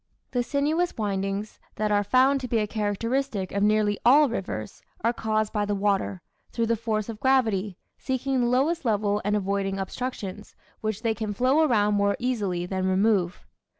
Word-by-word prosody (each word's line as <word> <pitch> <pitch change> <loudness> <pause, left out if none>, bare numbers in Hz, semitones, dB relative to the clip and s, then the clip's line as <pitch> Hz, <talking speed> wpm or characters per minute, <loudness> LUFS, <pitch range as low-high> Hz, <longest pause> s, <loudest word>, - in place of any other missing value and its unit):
The 245 - +1
sinuous 300 +7 0
windings, 200 0 -2 0.2
that 215 0 -1
are 205 0 +3
found 260 +5 +3
to 250 - -4
be 235 - 0
a 215 - +1
characteristic 215 +1 -2
of 200 - -1
nearly 210 0 +2
all 285 +4 +6
rivers, 145 - -5 0.2
are 230 +2 +2
caused 215 -2 -1
by 210 -2 +1
the 205 0 -1
water, 195 -2 0 0.3
through 230 - 0
the 230 +1 +1
force 215 -2 -2
of 225 -2 -7
gravity, 220 -8 +1 0.2
seeking 265 0 -1
the 240 - +2
lowest 280 +8 +1
level, 210 -3 +1
and 210 +1 +1
avoiding 195 -1 -1
obstructions, 210 -1 -5 0.2
which 215 0 -3
they 225 -1 +2
can 215 -1 -4
flow 260 +7 +3
around 210 -9 +3
more 200 0 +2
easily 210 -9 -1
than 185 0 -2
remove. 190 -2 +1
215 Hz, 175 wpm, -26 LUFS, 200-245 Hz, 0.3 s, all